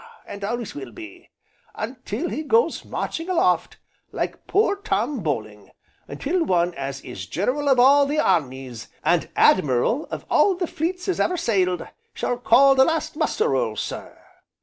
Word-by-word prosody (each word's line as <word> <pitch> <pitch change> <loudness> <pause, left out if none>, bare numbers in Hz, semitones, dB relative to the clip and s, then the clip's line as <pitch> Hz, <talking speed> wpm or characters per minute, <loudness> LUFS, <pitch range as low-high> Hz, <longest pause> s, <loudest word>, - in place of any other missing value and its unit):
and 200 0 -8
always 235 +1 -3
will 135 -4 -8
be 105 -2 -12 0.5
until 245 +4 -4
he 310 - -3
goes 455 +9 +1
marching 330 +3 -4
aloft, 365 - +1 0.3
like - - -4
poor 405 0 +2
Tom 300 -8 -2
Bowling, 110 - -4 0.4
until 325 - -1
one 175 - +1
as 135 -2 -5
is 95 -7 -8
General 255 - -1
of 260 -2 +4
all 280 +3 +6
the 295 +2 -1
armies, 130 - -1 0.2
and - - +1
Admiral 145 - +3
of - - -6
all 390 - +3
the 355 0 -2
fleets 360 +4 -3
as 375 - -1
ever 360 - +1
sailed, 190 - 0 0.3
shall 245 - -2
call 275 +2 +6
the 265 0 +5
last 325 +3 -1
muster 450 +2 0
roll, - - 0
sir. - - -6
245 Hz, 155 wpm, -23 LUFS, -, 0.5 s, all